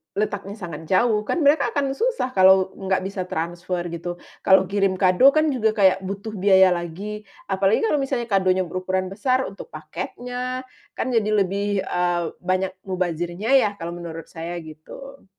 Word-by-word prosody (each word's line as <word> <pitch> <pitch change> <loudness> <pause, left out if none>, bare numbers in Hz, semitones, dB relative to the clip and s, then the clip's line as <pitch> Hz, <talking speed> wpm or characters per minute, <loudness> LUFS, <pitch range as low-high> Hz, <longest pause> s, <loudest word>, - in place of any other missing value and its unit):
letaknya 205 -1 -2
sangat 160 -3 -7
jauh, 210 +2 +3
kan 345 - 0
mereka 290 +3 +3
akan 280 -2 +1
susah 460 - -1
kalau 190 0 +5
enggak 190 -1 0
bisa 190 -1 -3
transfer 175 +2 -3
gitu, 170 +1 -5 0.3
kalau 190 0 +6
kirim 195 -2 +1
kado 190 +9 +6
kan 310 0 +3
juga 220 -3 +2
kayak 195 -2 +4
butuh 200 +3 -5
biaya 190 -1 +5
lagi, 190 +5 -4 0.3
apalagi 195 +2 +2
kalau 440 - +2
misalnya 265 -3 -2
kadonya 185 -1 +3
berukuran 185 +1 -2
besar 255 +6 +1
untuk 195 - -10
paketnya, 250 +11 -5 0.3
kan - - -2
jadi 215 -2 +2
lebih, 200 +1 -1
eee, 175 -1 0 0.2
banyak 185 +1 -1 0.2
mubazirnya 180 +4 -2
ya, 220 -6 +5
kalau 170 +1 -5
menurut 165 -1 -8
saya, 170 +1 -6
gitu. 165 - -12
190 Hz, 155 wpm, -23 LUFS, 180-220 Hz, 0.3 s, kalau